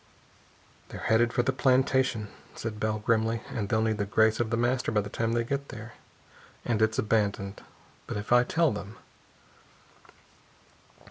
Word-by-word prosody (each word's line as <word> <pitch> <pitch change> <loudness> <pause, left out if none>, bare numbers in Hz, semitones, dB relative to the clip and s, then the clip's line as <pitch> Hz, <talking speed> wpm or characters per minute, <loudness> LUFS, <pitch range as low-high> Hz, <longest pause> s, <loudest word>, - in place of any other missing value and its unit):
"They're - - -8
headed 115 +1 +3
for 120 - +1
the 130 - +1
plantation," 130 -4 +2 0.3
said 110 -2 -5
Bell 110 0 0
grimly, 110 +1 +1
"and 105 -3 -3
they'll 110 -1 +2
need 110 -1 0
the 100 - 0
grace 110 +2 +3
of 120 -2 0
The 115 - 0
Master 120 +1 0
by 105 -2 +2
the 100 0 -8
time 115 0 -1
they 120 0 +1
get 140 +3 -3
there. 115 +2 -9 0.7
And 110 -3 0
it's 110 0 +2
abandoned. 100 -2 0 0.5
But - - -4
if 105 +2 -6
I 125 0 +6
tell 160 +3 +2
them...." 105 0 -7
110 Hz, 160 wpm, -28 LUFS, 105-120 Hz, 0.7 s, I